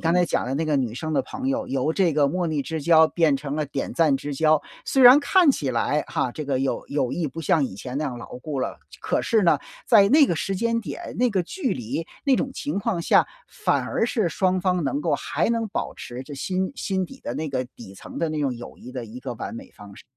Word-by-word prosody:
刚 165 0 +1
才 180 0 +4
讲 - - 0
的 130 +2 -2
那 160 +2 -1
个 150 - +2
女 125 -4 -1
生 155 +4 -3
的 - - +2
朋 260 +1 -5
友， 275 0 -1
由 135 +4 -1
这 180 -5 +2
个 145 -1 +3
莫 180 +3 -1
逆 155 -3 -1
之 160 +1 -4
交 160 0 +6
变 160 -5 +2
成 145 +1 -4
了 155 - 0
点 140 -1 -4
赞 160 -4 +3
之 145 0 -5
交， 155 +1 +3 0.2
虽 270 - +2
然 250 +3 +10
看 345 +2 +4
起 145 - -1
来 145 +5 +1
哈， 130 - -1
这 150 +4 -6
个 135 -2 -1
友 135 - -2
友 140 -4 0
谊 170 - -1
不 165 +3 -6
像 155 -1 +2
以 110 - -5
前 125 +6 -6
那 155 - -1
样 125 -4 -4
牢 - - -9
固 140 0 -4
了， - - -3
这 - - -14
可 - - 0
是 220 -4 +2
呢， 155 -4 +4 0.3
在 205 -4 +6
那 290 +1 +6
个 170 - 0
时 195 +4 -2
间 230 +2 0
点、 - - -7
那 250 -1 +3
个 190 -3 +1
距 290 - -2
离、 125 +7 -4 0.2
那 275 -2 +4
种 270 - -1
情 285 -6 -3
况 200 -5 -1
下， - - +4 0.2
反 - - 0
而 - - 0
是 215 -8 0
双 185 +3 +1
方 180 -2 +1
能 280 - -1
够 - - +1
还 - - -1
能 230 -2 -1
保 - - -3
持 120 +1 -8
着 145 - -8
心 185 - -2
心 190 -6 -2
底 270 - -13
的 - - -5
那 155 0 -3
个、 130 -2 -2
底 95 - -11
层 - - -9
的 165 - 0
那 155 -1 -2
种 135 -3 0
友 120 - -10
谊 125 - -11
的 125 -2 -5
一 115 +3 -10
个 125 -3 -5
完 115 - -6
美 - - -9
方 100 -1 -13
式。 - - -14
160 Hz, 285 characters per minute, -24 LUFS, 135-195 Hz, 0.3 s, 然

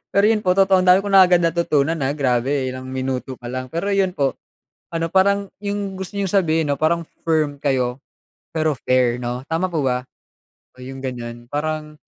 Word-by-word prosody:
Pero 200 - +3
yun 215 -1 +2
po 185 - +1
totoong 190 0 +4
dami 180 0 +6
kong 200 0 -2
na 190 - +9
agad 180 -1 +5
natutunan 165 -3 +1
na 140 -4 -1
grabe 135 -1 0
ilang 130 0 -6
minuto 130 0 -3
pa 120 - -10
lang. 130 +1 -5
Pero 170 +6 -3
yun 195 -1 +2
po, 140 -6 0 0.6
ano 165 0 -1
parang 200 +3 +2 0.2
yung 200 -1 -3
gusto 190 -1 -6
niyong 200 -1 -1
sabihin 165 -5 +2
ano - - 0
parang 165 +2 +1 0.2
firm 155 -3 +1
kayo 130 -2 0 0.6
pero 155 -1 +2 0.2
fair 125 -2 +3
no 125 +1 -4
tama 165 +3 +1
po 160 -4 -1
ba? 125 -1 0 0.7
Oh, 130 - -12
yung 135 +1 -8
ganyan 120 -2 -6
parang 150 0 -3
155 Hz, 190 wpm, -21 LUFS, 130-185 Hz, 0.7 s, na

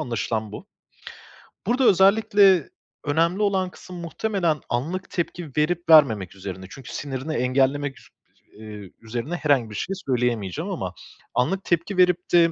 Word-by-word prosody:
anlaşılan 115 -5 -3
bu. - - -9 1.0
Burada 250 +4 +2
özellikle 195 -2 +5 0.4
önemli 165 +6 +1
olan 190 -3 +1
kısım 180 0 -12
muhtemelen 170 - -1
anlık 165 +11 -3
tepki 175 -2 -4
verip 170 +3 0
vermemek 110 - +5
üzerine. 95 -1 -7
Çünkü 130 +4 -10
sinirini 140 +2 -4
engellemek 135 +2 +1
su - - -20 0.5
eee, 105 -3 -9
üzerine 120 +9 -4
herhangi 140 -8 +1
bir 105 - -9
şey 195 - -3
söyleyemeyeceğim 120 -8 -1
ama - - -4 0.4
anlık 185 +10 0
tepki 170 +3 -1
verip 180 -1 +3
de 170 -1 +6
150 Hz, 135 wpm, -24 LUFS, 120-180 Hz, 1.0 s, de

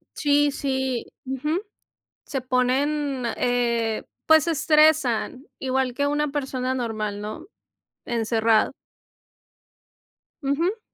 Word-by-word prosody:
Sí, 290 -1 +3
sí. 265 -3 -2 0.2
Ujú. 300 +7 -1 0.6
Se 270 -2 -3
ponen, 260 +1 0
eh, 235 -2 0 0.2
pues 315 -1 +6
se 335 - +1
estresan 305 -4 +3
igual 260 -1 0
que 285 +2 0
una 295 0 0
persona 265 -3 -2
normal, 215 -4 -3
¿no? 215 - -7 0.6
Encerrado. 225 -1 +2 1.7
Ujú. 335 +11 0
265 Hz, 95 wpm, -24 LUFS, 240-290 Hz, 1.7 s, pues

